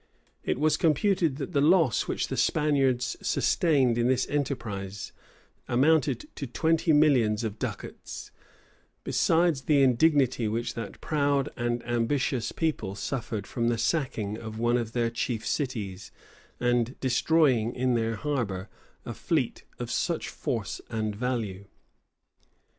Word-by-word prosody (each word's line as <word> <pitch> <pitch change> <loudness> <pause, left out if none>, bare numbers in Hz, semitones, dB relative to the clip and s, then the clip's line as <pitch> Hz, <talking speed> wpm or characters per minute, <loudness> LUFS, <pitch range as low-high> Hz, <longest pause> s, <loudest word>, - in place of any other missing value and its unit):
It - - -1
was 155 0 +3
computed, 165 -1 +2
that 140 +2 -5
the 145 -4 +2
loss 160 -3 +3
which - - -2
the - - -2
Spaniards 135 -5 +1
sustained 135 -8 +2
in 120 - +2
this 130 0 +1
enterprise 110 -9 -3 0.6
amounted 155 - +2
to 140 - -4
twenty 160 +6 +1
millions 125 -8 +4
of 110 -1 -4
ducats;[*] - - -6 0.7
besides 165 -4 +2
the 140 -1 +3
indignity 130 -2 +3
which 115 +2 -2
that 115 -3 -7
proud 145 -2 +1
and 120 -1 -2
ambitious 120 +1 0
people 155 - -2
suffered 110 -2 -4
from 115 +3 -2
the 120 -1 +1
sacking 115 -6 -1
of 110 -1 -7
one 120 +1 +2
of 115 -1 -5
their 115 -1 0
chief 120 -1 -2
cities, 105 -9 -3 0.5
and 120 0 0
destroying 130 -3 +2
in 125 0 +1
their 115 -1 0
harbor 110 -8 -2 0.4
a - - -5
fleet - - -1
of - - -5
such - - -1
force - - -3
and 110 -2 -2
value. 110 -5 -3
125 Hz, 130 wpm, -27 LUFS, 115-145 Hz, 0.7 s, millions